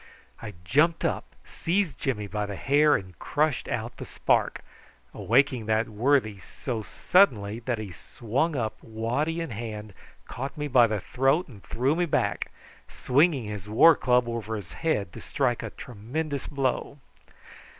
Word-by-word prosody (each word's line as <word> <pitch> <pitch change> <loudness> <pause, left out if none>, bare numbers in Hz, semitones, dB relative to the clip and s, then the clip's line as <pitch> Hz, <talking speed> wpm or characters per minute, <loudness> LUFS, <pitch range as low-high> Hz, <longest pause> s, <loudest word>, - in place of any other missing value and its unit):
I 105 -3 -7
jumped 155 - +3
up, - - -3
seized 175 -2 -1
Jimmy 105 -7 -1
by 105 0 -3
the 100 - -5
hair, 145 +6 +4
and 95 -1 -6
crushed 155 -2 0
out - - -4
the - - -7
spark, - - 0 0.5
awaking 125 -2 +2
that 110 +1 +2
worthy 110 -2 +1
so 115 +3 -5
sharply 110 - +2
that 120 0 -2
he 105 -3 -6
sprang 125 - -2
up 110 -4 -3
waddy 125 +9 -2
in 165 - -4
hand, 110 -2 -6 0.3
caught 135 +5 -6
me 150 0 -2
by 125 -4 +5
the 105 -3 -2
throat, 135 - +1
and 110 -8 -13
threw 130 +6 0
me 175 0 +1
back, - - 0 0.4
swinging 140 0 +2
his 105 -1 -6
war 160 +10 +7
club 125 -1 +2
over 115 -2 -3
his 100 -5 -8
head 105 - -1
to - - -9
strike - - 0
a - - -5
tremendous 135 +6 -5
blow. 140 0 -2
125 Hz, 155 wpm, -27 LUFS, 110-145 Hz, 0.5 s, war